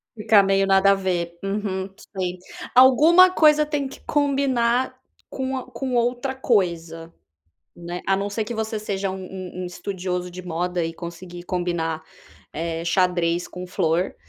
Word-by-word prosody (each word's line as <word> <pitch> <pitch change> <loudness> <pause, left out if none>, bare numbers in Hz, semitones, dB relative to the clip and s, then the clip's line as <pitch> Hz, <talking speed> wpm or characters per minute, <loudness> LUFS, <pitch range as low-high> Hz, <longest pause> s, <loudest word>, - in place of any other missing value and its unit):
Ficar 215 -2 +4
meio 195 0 +2
nada 195 0 +5
a - - +6
ver. 175 -3 -2
Uhum, 195 -1 -2 0.3
sei. 180 -1 -2 0.4
Alguma 310 +9 +7
coisa 305 -3 +5
tem 290 -2 -2
que - - -11
combinar 260 -4 +1 0.3
com 265 0 -3
a 260 - -5
com 260 -2 -3
outra 245 +2 0
coisa, 170 -9 -1 0.7
né, 175 +1 -6
a 195 - +3
não 200 +1 -2
ser 215 +2 -2
que 235 - -5
você 220 0 -2
seja 200 -2 -3
um 190 - -5
um 185 -1 -7
um - - -3
estudioso 180 0 -4
de 180 +1 -8
moda 175 0 -2
e 165 0 -4
conseguir 175 +1 -8
combinar, 170 -3 -2 0.5
eh, 165 +1 -3
xadrez 175 -1 +1
com 180 0 -8
flor 175 0 0
190 Hz, 155 wpm, -23 LUFS, 175-240 Hz, 0.7 s, Alguma